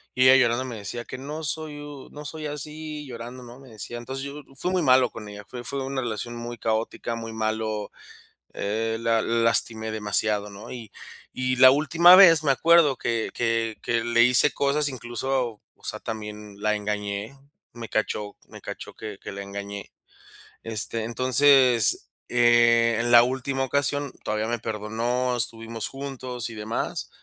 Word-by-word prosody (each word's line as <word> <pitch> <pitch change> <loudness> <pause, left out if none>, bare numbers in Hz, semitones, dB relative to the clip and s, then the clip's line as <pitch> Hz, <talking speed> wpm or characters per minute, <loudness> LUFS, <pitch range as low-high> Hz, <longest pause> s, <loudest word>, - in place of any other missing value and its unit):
y 130 - +3
ella 130 - +8
llorando 125 -1 +3
me 125 - -6
decía: 110 +3 -6
"Que - - -7
no 150 +4 -6
soy 155 0 -4
u 145 -2 -10
no 150 - -9
soy 155 +1 -7
así, 150 +1 -6
llorando", 120 +1 -8
¿no?, 120 +2 -12
me 135 - -15
decía, 110 +2 -7
entonces, 130 +3 -6
yo 145 +1 -8
fui 175 - -2
muy 185 -2 +1
malo 130 -2 +5
con 110 -2 -10
ella, 105 0 -9
fue 125 -1 -8
fue 135 +2 -3
una 135 0 -3
relación 120 0 -4
muy 120 0 -6
caótica, 115 +1 -2
muy 115 -1 -7
malo, 110 -1 -2 0.6
eh, 110 +2 -2
la 115 -1 +2
lastimé 115 -1 +1
demasiado, 105 -1 0
¿no?, 100 +1 -11
y 115 -4 -8 0.4
y 130 0 -1
la 130 +1 +9
última 165 +5 +6
vez 165 -5 +8
me 140 - +4
acuerdo 165 0 +4
que 115 -1 -2
que 115 -1 -1
que 115 -1 0
le 120 0 +4
hice 125 +4 +4
cosas, 145 +1 +1
incluso, 120 -2 -3
o - - -31
sea, - - -4
también 105 -2 -7
la 105 0 +1
engañé, 105 +3 -4 0.4
me 115 -2 -8
cachó 105 -1 -2
me - - -12
cachó - - -8
que 105 -2 -8
que - - -8
la 100 - -6
engañé. 100 0 -7 0.7
Este, 115 0 -3
entonces, 130 0 +4 0.2
eh, 120 -1 +4
en 120 0 0
la 120 0 +9
última 130 +1 -2
ocasión 140 0 0
todavía 110 +1 -2
me 120 0 -2
perdonó, 115 +3 -2
estuvimos 115 -1 -2
juntos 130 -3 -6
y 115 - -9
demás. 110 +2 -3
120 Hz, 170 wpm, -25 LUFS, 110-135 Hz, 0.7 s, la